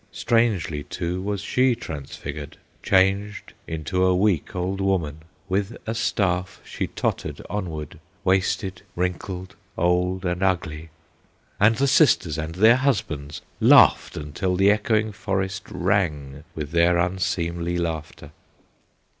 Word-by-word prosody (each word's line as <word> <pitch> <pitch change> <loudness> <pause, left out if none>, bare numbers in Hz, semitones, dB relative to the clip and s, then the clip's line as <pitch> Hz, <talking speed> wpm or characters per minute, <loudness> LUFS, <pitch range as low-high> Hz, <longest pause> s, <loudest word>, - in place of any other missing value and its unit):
Strangely, 105 -10 +1
too, 90 +4 -4
was 100 0 -2
she 125 +4 +2
transfigured. 75 - -7 0.2
Changed 100 +2 +1
into 80 +3 -1
a 95 0 +4
weak 95 0 +1
old 95 +2 -2
woman, 85 -6 -1 0.3
With 100 +4 -1
a 115 - -2
staff 95 -5 -1
she - - -3
tottered - - -3
onward, 80 -8 -5 0.2
Wasted, 95 0 0
wrinkled, 90 +1 -3 0.2
old, 90 +2 +1
and 90 +1 -1
ugly! 80 -4 -1 0.7
And 105 +3 +5
the 135 - +1
sisters 110 - +3
and 80 +1 -4
their 110 +6 +6
husbands 80 - -2 0.2
Laughed - - +5
until 75 +5 -2
the 95 +2 +5
echoing 110 +1 +1
forest 95 -3 -3
Rang 75 -7 -1
with 75 -2 -5
their 85 +1 +4
unseemly 85 -1 -1
laughter. 80 -3 -4
90 Hz, 120 wpm, -24 LUFS, 80-100 Hz, 0.7 s, their